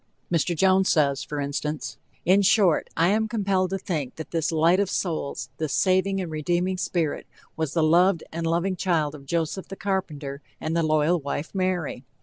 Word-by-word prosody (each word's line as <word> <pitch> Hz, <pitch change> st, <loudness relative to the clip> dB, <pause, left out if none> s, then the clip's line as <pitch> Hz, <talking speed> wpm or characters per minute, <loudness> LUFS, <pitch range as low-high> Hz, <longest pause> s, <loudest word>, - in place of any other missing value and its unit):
Mr. 170 Hz, +1 st, +1 dB
Jones 190 Hz, +2 st, +4 dB
says, 140 Hz, -4 st, +2 dB
for 150 Hz, -, -5 dB
instance: 145 Hz, +2 st, -3 dB, 0.3 s
"In 190 Hz, +3 st, +5 dB
short, 195 Hz, -4 st, +3 dB
I 165 Hz, +2 st, +4 dB
am 220 Hz, +2 st, +2 dB
compelled 195 Hz, -4 st, 0 dB
to 195 Hz, -, -1 dB
think 155 Hz, -9 st, -3 dB
that 160 Hz, -, -8 dB
this 165 Hz, -1 st, 0 dB
Light 165 Hz, +3 st, +3 dB
of 200 Hz, -2 st, +1 dB
Souls, 155 Hz, -, -3 dB
this 155 Hz, -3 st, -2 dB
saving 190 Hz, +1 st, +2 dB
and 180 Hz, -4 st, -4 dB
redeeming 175 Hz, +4 st, -1 dB
spirit, 165 Hz, -5 st, -1 dB, 0.3 s
was 160 Hz, -3 st, -2 dB
the 165 Hz, -, +3 dB
loved 170 Hz, +2 st, +4 dB
and 165 Hz, 0 st, -3 dB
loving 175 Hz, +3 st, 0 dB
child 165 Hz, -6 st, 0 dB
of 140 Hz, -2 st, -12 dB
Joseph, 170 Hz, +4 st, -2 dB
the 195 Hz, -, -7 dB
carpenter, 155 Hz, -9 st, -3 dB, 0.2 s
and 160 Hz, +1 st, -2 dB
the 170 Hz, -, +2 dB
loyal 155 Hz, +2 st, +2 dB
wife 145 Hz, +2 st, -4 dB
Mary. 185 Hz, -8 st, -1 dB
170 Hz, 180 wpm, -25 LUFS, 155-185 Hz, 0.3 s, In